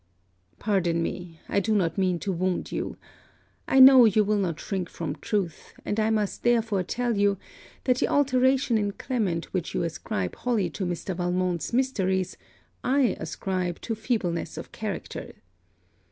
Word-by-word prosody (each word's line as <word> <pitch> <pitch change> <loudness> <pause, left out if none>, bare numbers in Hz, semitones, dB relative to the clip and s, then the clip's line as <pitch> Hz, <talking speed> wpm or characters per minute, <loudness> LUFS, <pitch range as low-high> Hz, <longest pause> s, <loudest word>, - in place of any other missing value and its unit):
Pardon 175 -5 +1
me, 170 -2 -5
I - - +1
do 215 +2 +1
not 170 -5 +1
mean 185 -3 +1
to 200 - -1
wound 180 +1 -1
you. - - -3 0.7
I 265 - +4
know 260 -2 +10
you 215 0 +4
will 210 0 +1
not 170 -4 -1
shrink 190 -4 -3
from 160 -4 -4
truth; 180 +1 -3
and 205 - -1
I 215 0 +2
must 215 -3 -1
therefore 225 -5 +2
tell 240 +5 -1
you, 200 -1 +2 0.5
that 255 -1 +2
the - - +2
alteration 260 -3 +3
in 205 -1 -1
Clement 195 -11 -2
which 180 -3 -2
you - - +1
ascribe 100 - -3
wholly 220 -8 0
to 190 +3 -3
Mr. 175 +1 -3
Valmont's 180 -1 -1
mysteries 190 -8 0 0.5
I 260 -3 +2
ascribe 185 -2 -3
to 230 - -3
feebleness 215 -6 -2
of - - -7
character. - - -5
200 Hz, 155 wpm, -26 LUFS, 180-230 Hz, 0.7 s, know